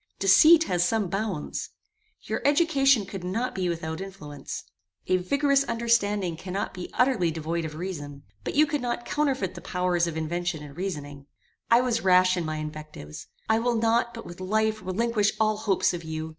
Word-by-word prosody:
Deceit 305 - +7
has 175 - +1
some 205 0 0
bounds. 195 -5 -3 0.5
Your - - -3
education 280 - +3
could 190 -1 -7
not 225 +8 -2
be 185 -2 -1
without 160 0 -4
influence. 190 -7 -7 0.4
A 185 - +2
vigorous 280 +9 +2
understanding 210 -7 +1
cannot 190 +3 -4
be 180 -1 -7
utterly 250 -10 +3
devoid 165 +1 -3
of 155 - -6
virtue; 150 -5 -6 0.2
but - - -4
you 305 +2 +6
could 295 -1 -2
not 240 -1 -3
counterfeit 270 - 0
the 175 - -9
powers 180 -1 0
of 165 -1 -4
invention 170 0 -2
and 140 -1 -11
reasoning. 145 -6 -5 0.4
I 235 +1 +6
was 240 -2 0
rash 185 0 +5
in 175 -2 -2
my 155 0 -3
invectives. 155 - -8 0.2
I 220 0 +3
will 240 +1 +1
not, 230 +1 +2
but 230 - -8
with 175 +2 -10
life, 215 +3 0
relinquish 210 +2 0
all 215 -1 +2
hopes 200 -4 +1
of 170 -1 -5
you. 160 0 -5
190 Hz, 175 wpm, -26 LUFS, 170-230 Hz, 0.5 s, Deceit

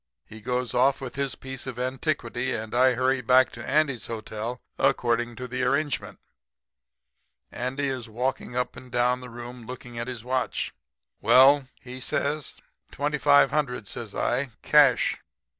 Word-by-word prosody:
He 110 0 -12
goes 125 0 -2
off 130 +2 +3
with 130 -2 -6
his 140 -2 -2
piece 130 0 -8
of 125 -2 -5
antiquity 130 -1 -1
and 110 0 -5
I 125 +1 +4
hurry 130 +1 +1
back 125 +2 +4
to 120 - -9
Andy's 140 -4 +1
hotel, 115 +2 -5 0.2
according 120 0 +1
to 125 - -6 0.2
arrangement. 140 +3 -1 1.3
"Andy 130 +3 -2
is 130 -4 -3
walking 125 +2 -3
up 125 0 -1
and 130 -1 -12
down 125 +1 +2
the 125 - -9
room 120 0 -9
looking 125 -2 -8
at 120 - -3
his 125 -4 -5
watch. 130 +1 -2 0.5
"'Well?' 135 +1 +6
he 125 0 -9
says. 145 +3 -1 0.4
"'Twenty 145 +1 -1
five 145 0 +5
hundred,' 125 -8 -1
says 110 0 -6
I. 130 +2 0
'Cash.' 145 -5 +4
125 Hz, 150 wpm, -26 LUFS, 120-135 Hz, 1.3 s, Well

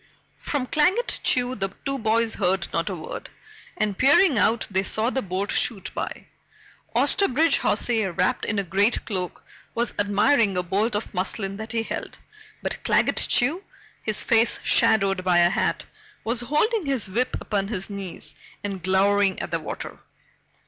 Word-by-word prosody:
From 285 -4 -2
Claggett 365 - +1
Chew 250 0 +1
the 195 -5 -3 0.2
two 275 -1 -2
boys 225 0 +1
heard 185 -2 0
not 165 +2 0
a 190 - -3
word, 160 - -7 0.5
and 215 -2 0
peering 285 - +5
out, 225 +1 +2
they 190 0 +2
saw 220 +5 0
the 265 - -1
boat 195 0 -2
shoot 210 -6 0
by. - - -5 0.7
Osterbridge 325 -4 +3
Hawsey, 225 -4 +1
wrapped 185 0 0
in 210 - -1
a 200 - +1
great 200 +6 +1
cloak, 185 -4 -4 0.3
was 235 +1 0
admiring 205 +1 +3
a 180 - 0
bolt 205 +5 0
of 210 - -4
muslin 195 +1 -2
that 220 +2 -6
he 225 -1 0
held, - - -6 0.5
but - - -3
Claggett - - +2
Chew, 310 +10 +2 0.4
his 215 -1 0
face 230 0 +3
shadowed 195 -4 +3
by 180 -1 +3
a 175 0 +5
hat, - - 0 0.4
was 230 +2 0
holding 305 - 0
his 265 -7 0
whip 235 +7 -1
upon 200 -2 -2
his 195 -3 -3
knees 200 -3 -7 0.3
and 195 -2 -4
glowering 195 +1 +2
at - - -5
the 165 - 0
water. 155 - -7
210 Hz, 165 wpm, -24 LUFS, 190-245 Hz, 0.7 s, peering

